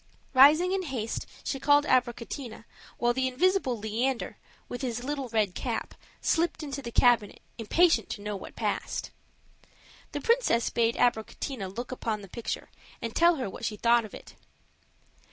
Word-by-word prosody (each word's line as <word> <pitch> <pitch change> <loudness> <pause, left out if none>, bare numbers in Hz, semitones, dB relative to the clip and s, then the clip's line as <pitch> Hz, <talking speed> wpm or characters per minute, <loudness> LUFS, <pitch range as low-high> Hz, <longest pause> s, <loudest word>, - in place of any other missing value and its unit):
Rising 300 +7 +7
in 385 0 +1
haste, 255 -10 -4 0.2
she 270 - -3
called 290 +1 +4
Abricotina, 245 -2 -1 0.3
while 240 0 +2
the 260 +1 0
invisible 270 -1 +1
Leander, 230 +4 -2 0.3
with 245 - -6
his 245 -2 -3
little 275 -2 -3
red 215 -4 +1
cap, - - -3 0.3
slipped 330 -1 +1
into 280 -1 -5
the 235 -3 -6
cabinet, 235 -4 +3 0.2
impatient 235 - +3
to - - -5
know 210 0 -3
what 190 - -9
passed. - - -2 1.0
The - - -3
princess 465 - +2
bade 230 0 +2
Abricotina 235 -1 -1
look 240 +7 -6
upon 225 -4 -3
the - - -10
picture 230 +5 -5 0.3
and 230 -1 -5
tell 340 +1 +5
her 260 -6 -3
what 190 - -9
she 210 - -2
thought 235 +2 +4
of 215 - -9
it. - - -12
245 Hz, 155 wpm, -28 LUFS, 225-285 Hz, 1.0 s, Rising